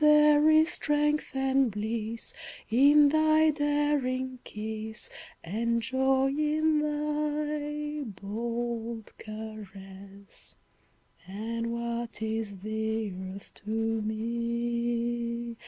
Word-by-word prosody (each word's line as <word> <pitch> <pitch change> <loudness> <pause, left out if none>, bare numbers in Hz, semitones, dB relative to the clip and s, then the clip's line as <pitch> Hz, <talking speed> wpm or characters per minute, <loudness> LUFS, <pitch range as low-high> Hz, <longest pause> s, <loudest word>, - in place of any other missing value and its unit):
There 300 0 +7
is 315 +1 +6
strength 295 -1 0
and 265 -1 +3
bliss 220 +2 -4 0.4
in 285 +4 +7
thy 310 +1 +4
daring 290 -4 0
kiss, 220 0 -6 0.3
And 230 +6 0
joy 265 +2 +2
in 305 +1 +2
thy 300 0 -2 0.2
bold 230 +2 -4
caress. 200 -2 -10 0.7
And 225 +4 -3
what 235 0 -3
is 220 -2 -2
the 220 0 -2
Earth 190 +1 -8
to 210 - -8 0.3
me! 235 +1 -2
235 Hz, 85 wpm, -29 LUFS, 220-295 Hz, 0.7 s, There